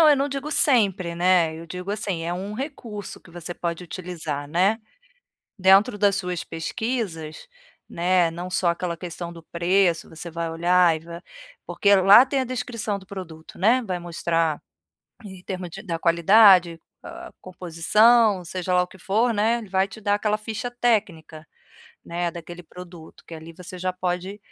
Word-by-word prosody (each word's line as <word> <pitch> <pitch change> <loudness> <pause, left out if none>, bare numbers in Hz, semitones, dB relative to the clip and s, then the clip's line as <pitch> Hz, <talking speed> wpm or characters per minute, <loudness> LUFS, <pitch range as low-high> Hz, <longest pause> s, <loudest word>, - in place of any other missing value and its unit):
não, 320 - +7
eu 290 - +5
não 275 +1 0
digo 280 +2 -5
sempre, 200 - +2
né, 175 -2 +2
eu 165 - -10
digo 180 +3 -6
assim, 205 -5 -3
é 170 - -2
um 190 +3 -5
recurso 235 - -7
que 170 - -18
você 175 0 -7
pode 170 0 -4
utilizar, 165 -5 -6
né, 190 +7 +2 0.8
dentro 195 +4 +4
das 200 -1 +3
suas 180 -3 -3
pesquisas, 165 - -4 0.4
né, 175 -1 +1
não 175 +2 -6
só 180 -1 +1
aquela 170 0 -3
questão 175 0 -7
do 165 -1 -12
preço, 175 0 +1
você 165 +1 -8
vai 165 0 -3
olhar 175 +1 +3
e 155 - -6
vai 170 0 -9 0.4
porque 200 +3 +3
lá 195 +6 +7
tem 275 0 -1
a - - 0
descrição 240 -4 -4
do 190 - -17
produto, 170 -5 -10
né, 235 +7 +4
vai 185 -5 -3
mostrar 165 -2 -1 0.7
em 190 -2 -11
termos 185 -2 -5
de 195 +4 -9
da 170 -6 -4
qualidade, 175 0 +5 0.2
a - - -9
a - - -19
composição, 185 +4 +2
seja 180 +1 -3
lá 180 - +4
o 180 - -4
que 190 - -17
for, 225 +6 +1
né, 225 +2 +1
ele 220 -4 -9
vai 190 +1 +1
te 195 +3 -12
dar 205 0 +2
aquela 210 0 0
ficha 220 +3 -5
técnica, 200 -10 -1 0.6
né, 175 0 -3
daquele 175 +1 -10
produto, 175 -1 -13
que - - -14
ali 160 +1 -10
você 180 +1 -10
já 185 +1 -1
pode 185 +2 -4
180 Hz, 175 wpm, -23 LUFS, 170-205 Hz, 0.8 s, não